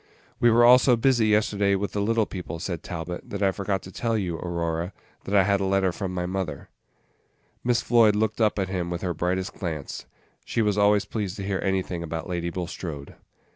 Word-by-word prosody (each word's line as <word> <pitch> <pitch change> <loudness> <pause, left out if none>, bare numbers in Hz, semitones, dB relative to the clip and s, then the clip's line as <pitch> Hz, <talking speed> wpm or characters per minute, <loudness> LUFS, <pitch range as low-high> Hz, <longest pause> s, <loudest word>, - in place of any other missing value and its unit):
"We 120 - +5
were 120 +2 +7
so 125 -1 +4
busy 120 -1 +3
all 105 - +3
yesterday 105 -2 +2
with 100 +1 -2
the 100 - -2
little 110 +1 +2
people," 90 -5 -6
said 85 0 -4
Talbot, 85 0 -6
"that 100 0 -3
I 95 - +4
forgot 100 0 -2
to 95 - -10
tell 115 +3 -1
you, 90 -5 -2
Aurora, 85 +1 -3 0.3
that 100 - -1
I 100 - +6
had 100 - +1
had 100 - +3
a - - 0
letter 95 -1 +2
from 95 +1 -4
my 90 -1 -2
mother." 90 -6 -4 0.9
Miss 120 -1 +1
Floyd 115 -3 +5
looked 110 +1 0
up 110 -1 +3
at 95 -2 0
him 90 -2 -3
with 85 +1 -4
her 90 -2 -1
brightest 90 +3 -2
glance. 80 -6 -5 0.4
She 115 - 0
was 105 -2 +1
always 105 0 +3
pleased 105 -4 -3
to 100 - -6
hear 95 -1 -1
anything 95 -3 -1
about 80 +1 -5
Lady 85 -2 -2
Bulstrode. 85 -5 -6
95 Hz, 210 wpm, -25 LUFS, 90-105 Hz, 0.9 s, were